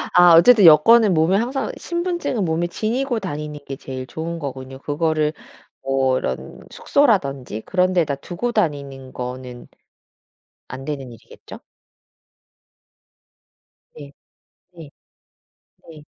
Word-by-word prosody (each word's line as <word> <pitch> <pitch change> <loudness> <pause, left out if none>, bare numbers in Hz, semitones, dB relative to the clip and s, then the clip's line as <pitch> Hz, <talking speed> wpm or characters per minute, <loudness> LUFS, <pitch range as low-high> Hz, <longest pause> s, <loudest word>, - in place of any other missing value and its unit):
아 175 -1 +8
어쨌든 210 +3 +7
여권은 190 +6 +6
몸에 160 +5 +3
항상 255 +4 -2
신분증은 345 - -3
몸에 165 +1 -1
지니고 240 +6 -2
다니는 150 -6 -6
게 135 - -6
제일 130 -1 -7
좋은 165 +5 -6
거군요. 135 -3 -7
그거를 155 +2 -1 0.5
뭐 135 -1 0
이런 65 - -5
숙소라든지 140 - 0
그런 185 - 0
데다 165 -6 +1
두고 175 - -4
다니는 140 - -3
거는 125 0 -7 1.0
안 130 +1 -9
되는 135 -4 -6
일이겠죠? 115 - -14 2.4
네. 140 -2 -11 0.6
네. 165 -4 -12 1.0
네. 155 -2 -13
155 Hz, 235 characters per minute, -20 LUFS, 135-190 Hz, 2.4 s, 아